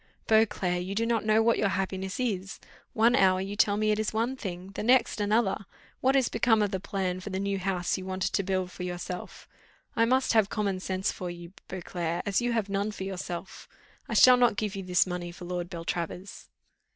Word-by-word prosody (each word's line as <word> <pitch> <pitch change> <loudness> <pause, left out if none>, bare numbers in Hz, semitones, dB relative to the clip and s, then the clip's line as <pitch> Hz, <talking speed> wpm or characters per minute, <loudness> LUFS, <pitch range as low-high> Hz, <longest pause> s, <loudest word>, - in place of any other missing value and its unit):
"Beauclerc, 200 -5 +2
you 195 +2 -5
do 225 +2 +1
not 230 -2 0
know 215 +1 +4
what 230 0 +3
your 205 - +3
happiness 190 +2 -3
is. 195 -6 -2 0.3
One 230 +2 +4
hour 190 -5 +4
you 195 +2 -4
tell 205 -1 +3
me 215 0 +2
it 210 - +1
is 215 - -1
one 230 +4 0
thing, 185 -5 -6
the - - -5
next 245 -1 +3
another. 205 -2 +1 0.3
What 265 +1 +2
is 265 -3 +4
become 225 -1 +3
of 205 - -1
the 190 - -2
plan 190 -2 -2
for 185 - -7
the 190 -1 -3
new 200 0 -1
house 185 -1 -1
you 185 - -7
wanted 185 0 -2
to - - +2
build 185 -1 -1
for - - -10
yourself? 180 0 -6 0.5
I 230 - +4
must 260 +2 +2
have 220 -3 +4
common 200 -3 -1
sense 190 +1 -1
for 180 - -6
you, 175 0 -9
Beauclerc, 175 -2 -3
as 200 +2 +1
you 240 0 0
have 225 -3 0
none 200 +1 -1
for 205 -2 -6
yourself. 190 -1 -6 0.4
I - - -2
shall 250 -1 +8
not 245 -3 +4
give 210 -2 -2
you 195 - -4
this 180 -1 +2
money 180 -1 -4
for 175 +1 -10
Lord 175 0 -4
Beltravers." 170 +2 -5
195 Hz, 215 wpm, -28 LUFS, 185-220 Hz, 0.5 s, shall